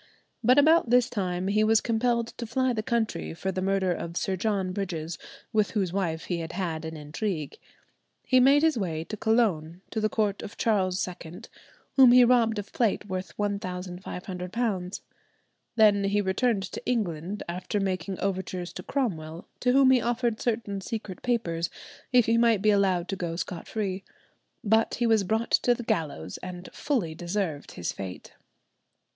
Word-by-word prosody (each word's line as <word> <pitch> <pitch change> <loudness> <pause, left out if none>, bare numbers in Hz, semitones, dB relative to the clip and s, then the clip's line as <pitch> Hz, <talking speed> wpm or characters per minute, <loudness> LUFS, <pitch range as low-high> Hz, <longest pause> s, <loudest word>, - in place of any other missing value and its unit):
But 250 +4 +5
about 310 -2 +5
this 245 0 +4
time 185 -3 -2
he 210 +2 +3
was 220 0 +5
compelled 235 0 0
to 235 - -4
fly 255 +2 +1
the 220 - -1
country 230 -7 -2
for 190 +3 -2
the 185 0 -3
murder 190 -1 +1
of 170 0 -5
Sir 190 - 0
John 195 -1 -1
Bridges, 175 -5 -4 0.3
with 215 -2 +2
whose 185 -4 0
wife 170 -5 -1
he 175 -2 -2
had 165 0 -5
had 165 -4 -3
an 160 0 -6
intrigue. 155 +1 -4 0.7
He 255 - +4
made 275 +4 +5
his 315 -7 +3
way 165 -5 -2
to 195 +6 -6
Cologne, 195 -7 +1
to 220 - -2
the 215 - +2
court 210 -3 0
of 210 - -9
Charles 190 -5 +1
II, 175 -1 -9 0.6
whom 255 -3 +8
he 250 0 +8
robbed 235 -3 +3
of 205 0 -6
plate 230 -4 +1
worth 185 -1 -5
£1,500. 185 0 -3 0.7
Then 210 -3 +5
he 200 +1 +2
returned 200 +2 +1
to - - -6
England, 200 -5 -2
after 180 +4 -3
making 190 -1 -2
overtures 185 -2 -3
to - - -6
Cromwell, 170 - -3
to 250 - +2
whom 265 0 +6
he 255 -2 +4
offered 235 -1 -1
certain 215 -4 -2
secret 210 -3 -6
papers 170 -9 -1 0.4
if 245 -3 +5
he 230 +1 +3
might 230 -4 +3
be 215 - +5
allowed 190 -3 +2
to 195 - -1
go 170 -3 -3
scot 170 0 -5
free. 195 -3 -3 0.6
But 220 +1 +2
he 240 - 0
was 220 -3 +4
brought 220 +4 -1
to 245 - +3
the 240 - -6
gallows, 145 - -2
and 180 0 -8
fully 230 - -1
deserved 170 -2 -3
his 85 - -3
fate. 95 -2 -8
200 Hz, 170 wpm, -27 LUFS, 180-230 Hz, 0.7 s, whom